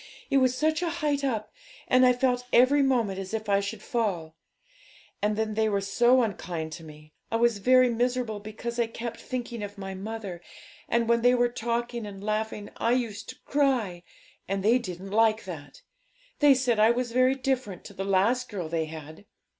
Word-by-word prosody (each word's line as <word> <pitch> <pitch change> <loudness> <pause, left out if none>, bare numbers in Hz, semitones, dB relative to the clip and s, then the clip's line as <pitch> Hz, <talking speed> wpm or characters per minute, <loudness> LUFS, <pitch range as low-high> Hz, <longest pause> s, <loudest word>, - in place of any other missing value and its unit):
it 275 - +4
was 255 -1 +3
such 315 +3 +1
a 345 - 0
height 300 -4 -1
up; 225 -6 -2 0.3
and 255 0 +5
I - - +6
felt 250 0 0
every 260 +4 +5
moment 235 -8 +1
as 195 +3 -4
if 220 -1 -4
I 200 -1 +3
should 200 +1 -5
fall. 180 -9 -2 0.9
And 210 0 0
then 220 -1 -1
they 220 0 +1
were 200 -1 +1
so 240 +6 +3
unkind 170 -6 -4
to 165 +1 -8
me. 155 -1 -14 0.2
I 225 - -2
was 230 -2 +2
very 255 +4 +5
miserable 240 -2 -1
because 225 +3 -6
I 235 - +2
kept 230 +1 -6
thinking 245 -3 -5
of 205 0 -7
my 195 -1 -6
mother; 195 -2 -6 0.5
and 235 -1 +1
when 235 0 +3
they 245 +1 +5
were 245 0 +2
talking 235 -1 -3
and 195 -1 -9
laughing 215 0 -3
I 230 - +1
used 225 -4 -2
to - - -9
cry, 255 -11 +1 0.5
and 195 0 -2
they 235 +5 +4
didn't 190 -3 -7
like 220 +1 +3
that. 145 -6 -9 0.6
They 290 -2 +6
said 250 -4 +1
I 215 +1 +6
was 240 0 0
very 255 +2 +3
different 255 -8 -2
to - - -10
the 195 - -4
last 205 +6 +1
girl 180 -7 -5
they 165 -1 -1
had. 155 +3 -10
225 Hz, 195 wpm, -27 LUFS, 200-250 Hz, 0.9 s, I